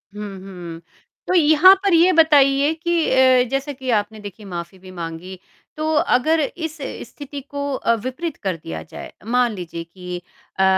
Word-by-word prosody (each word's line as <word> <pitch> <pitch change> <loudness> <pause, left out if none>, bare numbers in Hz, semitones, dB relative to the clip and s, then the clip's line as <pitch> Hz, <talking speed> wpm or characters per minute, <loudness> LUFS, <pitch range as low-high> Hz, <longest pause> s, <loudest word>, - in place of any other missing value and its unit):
हुँ, 210 - -6 0.2
हुँ। 175 -3 -9 0.5
तो 365 - 0
यहाँ 325 +2 +7
पर 390 -3 +2
ये 345 +3 +6
बताइए 290 -2 +4
कि 340 +1 -1
अ, 260 -1 +5
जैसा 275 +2 -2
कि 260 -1 -7
आपने 210 +1 -4
देखी 205 +1 -10
माफ़ी 175 0 -7
भी 185 0 -13
माँगी, 175 +1 -7 0.4
तो 315 +1 -1 0.2
अगर 315 +6 +2
इस 320 +2 -4 0.3
स्थिति 285 -1 -8
को 285 0 -5
अ, 230 - +1
विपरीत 280 +5 -4
कर 190 -3 -1
दिया 80 -1 -6
जाए, - - -10
मान 245 0 +2
लीजिए 170 -2 -6
कि 180 +1 -8 0.4
अ, - - +4
255 Hz, 165 wpm, -21 LUFS, 185-310 Hz, 0.5 s, यहाँ